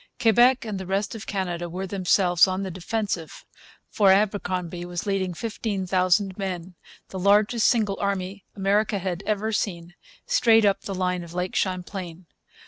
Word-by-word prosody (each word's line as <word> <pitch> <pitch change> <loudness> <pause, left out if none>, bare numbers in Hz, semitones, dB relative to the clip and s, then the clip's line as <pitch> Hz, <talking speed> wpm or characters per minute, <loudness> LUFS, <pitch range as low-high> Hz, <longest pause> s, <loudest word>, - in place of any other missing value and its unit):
Quebec 240 +3 +4
and 210 -3 -4
the 190 - -7
rest 195 +2 -1
of 220 -1 -8
Canada 175 -3 -3
were 185 +3 -4
themselves 185 -1 +3
on 190 +1 -2
the 190 - -4
defensive; 185 -2 -4 0.4
for 200 -2 +3
Abercromby 185 -3 0
was 175 +1 -5
leading 190 -3 -1
15,000 190 -2 0
men 185 -2 -4 0.4
the 190 - -6
largest 210 +4 +3
single 210 -5 +1
army 195 -1 -2
America 205 +2 +1
had 185 -1 -3
ever 215 +1 0
seen 175 -5 -3 0.3
straight 230 - +4
up 200 -1 +2
the 195 - -5
line 180 -1 -1
of 170 0 -11
Lake 180 0 -3
Champlain. 185 -2 -3
190 Hz, 150 wpm, -25 LUFS, 180-205 Hz, 0.4 s, Quebec